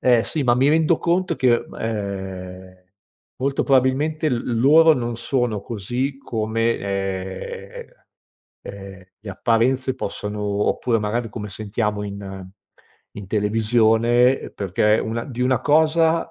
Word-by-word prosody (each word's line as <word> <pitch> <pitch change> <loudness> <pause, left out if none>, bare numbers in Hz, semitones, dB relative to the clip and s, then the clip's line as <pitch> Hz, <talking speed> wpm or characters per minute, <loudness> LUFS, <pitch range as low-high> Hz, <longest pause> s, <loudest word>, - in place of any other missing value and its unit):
ehm, 120 -3 +4
sì 155 -3 -2
ma 120 -1 +3
mi 135 +3 +3
rendo 160 +1 +3
conto 175 -1 0
che 125 -2 +4
m - - -13
ehm, 95 -3 -5 0.6
molto 140 +1 0
probabilmente 140 +4 +2
l 120 -2 -1
loro 160 +4 +6
non 120 -3 -2
sono 120 -5 -1
così 125 +6 -3
come, 115 -1 -1
ehm, 95 -1 -5 0.8
ehm, 95 -1 -10
le 105 -1 -8
apparenze 125 +5 +1
possono 105 -1 -4
oppure 105 +3 0
magari 115 +3 -2
come 105 -1 -7
sentiamo 105 +1 -3
in 95 -2 -7 0.7
in 100 -2 -7
televisione, 115 +4 +3
ehm, - - -10
perché 105 +3 +1
una 115 +1 -3
di 125 -4 -7
una 130 -1 +2
cosa, 160 +3 +2
115 Hz, 130 wpm, -22 LUFS, 100-130 Hz, 0.8 s, loro